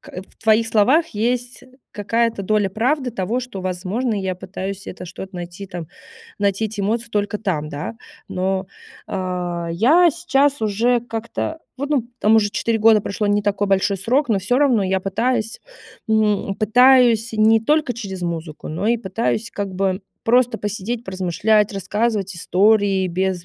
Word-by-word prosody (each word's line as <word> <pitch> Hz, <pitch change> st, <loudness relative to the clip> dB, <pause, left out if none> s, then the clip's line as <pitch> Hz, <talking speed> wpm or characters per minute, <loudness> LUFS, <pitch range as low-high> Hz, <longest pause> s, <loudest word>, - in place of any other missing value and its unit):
к 185 Hz, -, -9 dB
в -, -, -26 dB
твоих 220 Hz, 0 st, +3 dB
словах 255 Hz, +10 st, +3 dB
есть 245 Hz, +3 st, -2 dB, 0.3 s
какая-то 225 Hz, +1 st, -1 dB
доля 210 Hz, 0 st, +1 dB
правды 250 Hz, +5 st, 0 dB
того, 220 Hz, +4 st, -2 dB
что, 245 Hz, -6 st, -7 dB
возможно, 185 Hz, +6 st, -2 dB
я 190 Hz, -3 st, -2 dB
пытаюсь 195 Hz, +1 st, -6 dB
это 180 Hz, -, -7 dB
что-то 190 Hz, +2 st, -9 dB
найти 175 Hz, +2 st, -7 dB
там 175 Hz, -4 st, -7 dB, 0.5 s
найти 200 Hz, +1 st, +1 dB
эти 215 Hz, -1 st, -6 dB
эмоции 225 Hz, +4 st, -1 dB
только 205 Hz, 0 st, -1 dB
там, 160 Hz, -8 st, -2 dB
да. 150 Hz, +9 st, -6 dB, 0.3 s
Но, 190 Hz, +1 st, -1 dB, 0.4 s
э, -, -, -9 dB, 0.6 s
я 305 Hz, -, +5 dB
сейчас 285 Hz, -6 st, +1 dB
уже 230 Hz, +4 st, +2 dB
как-то 230 Hz, +7 st, -4 dB, 0.2 s
вот, 280 Hz, +2 st, -4 dB
ну, 255 Hz, -6 st, 0 dB
там 220 Hz, +1 st, +5 dB
уже 205 Hz, -2 st, +2 dB
4 225 Hz, +2 st, 0 dB
года 220 Hz, 0 st, +5 dB
прошло, 205 Hz, +1 st, -3 dB
не 205 Hz, 0 st, +2 dB
такой 205 Hz, 0 st, 0 dB
большой 195 Hz, +1 st, +2 dB
срок. 250 Hz, +10 st, +1 dB
Но 215 Hz, -4 st, +2 dB
всё 245 Hz, +7 st, +1 dB
равно 260 Hz, -7 st, +3 dB
я 190 Hz, 0 st, +1 dB
пытаюсь, 225 Hz, +4 st, -1 dB, 0.5 s
м, 210 Hz, -2 st, +1 dB
пытаюсь 235 Hz, 0 st, +4 dB
не 220 Hz, +1 st, +4 dB
только 300 Hz, +2 st, +1 dB
через 195 Hz, -6 st, -6 dB
музыку, 165 Hz, -3 st, -5 dB
но 175 Hz, +7 st, -3 dB
и 235 Hz, -, +3 dB
пытаюсь 225 Hz, +2 st, -2 dB
как 200 Hz, -2 st, -4 dB
бы 190 Hz, 0 st, 0 dB, 0.2 s
просто 245 Hz, +1 st, +3 dB
посидеть, 215 Hz, +3 st, -4 dB
поразмышлять, 190 Hz, +3 st, +1 dB
рассказывать 200 Hz, 0 st, -1 dB
истории 195 Hz, +1 st, +2 dB
без 185 Hz, 0 st, -1 dB
210 Hz, 160 wpm, -20 LUFS, 190-235 Hz, 0.6 s, я